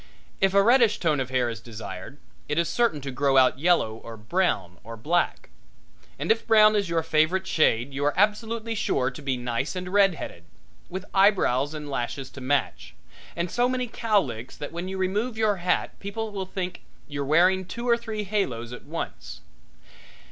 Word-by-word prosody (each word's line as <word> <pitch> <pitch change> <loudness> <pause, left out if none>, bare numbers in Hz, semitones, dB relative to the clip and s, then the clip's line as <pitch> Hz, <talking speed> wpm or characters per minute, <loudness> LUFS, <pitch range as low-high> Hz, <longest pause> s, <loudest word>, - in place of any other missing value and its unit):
If 195 0 +2
a 200 - +6
reddish 235 -1 +5
tone 155 -5 +1
of 130 -1 -2
hair 130 -2 +1
is 115 -2 -4
desired 110 0 -8 0.3
it 150 - -1
is 170 -1 +2
certain 230 -12 +1
to 135 0 -5
grow 135 +1 +2
out 130 0 +4
yellow 150 -9 +2
or 115 0 -10
brown 110 - -1
or 115 +2 -9
black; 170 +10 0 0.7
and - - 0
if 225 - 0
brown 215 -1 +6
is 200 -4 0
your 165 -1 0
favorite 160 +4 +2
shade 135 -6 +2
you 140 +1 -3
are 145 - +2
absolutely 220 +3 +1
sure 135 - 0
to 130 - -10
be 135 -2 -1
nice 125 +6 -2
and 180 0 -5
red 195 -3 +5
headed, 85 - -8 0.4
with 185 +2 -5
eyebrows 170 -8 +3
and 150 -1 -6
lashes 135 0 -4
to 135 - -10
match, 135 -9 -1 0.4
and 170 0 -2
so 245 +1 +2
many 255 -1 -1
cowlicks 190 - -1
that 145 - -6
when 170 +2 -5
you 190 0 -4
remove 210 +6 -1
your 215 -2 +2
hat 180 0 -1
people 215 +2 -4
will 195 -2 -4
think 185 -1 -5 0.3
you're 140 -1 -4
wearing 180 +6 +3
two 235 +6 -6
or 235 - +5
three 220 -2 -5
halos 130 - -2
at 125 - -10
once. 165 +3 -6
170 Hz, 185 wpm, -25 LUFS, 130-205 Hz, 0.7 s, a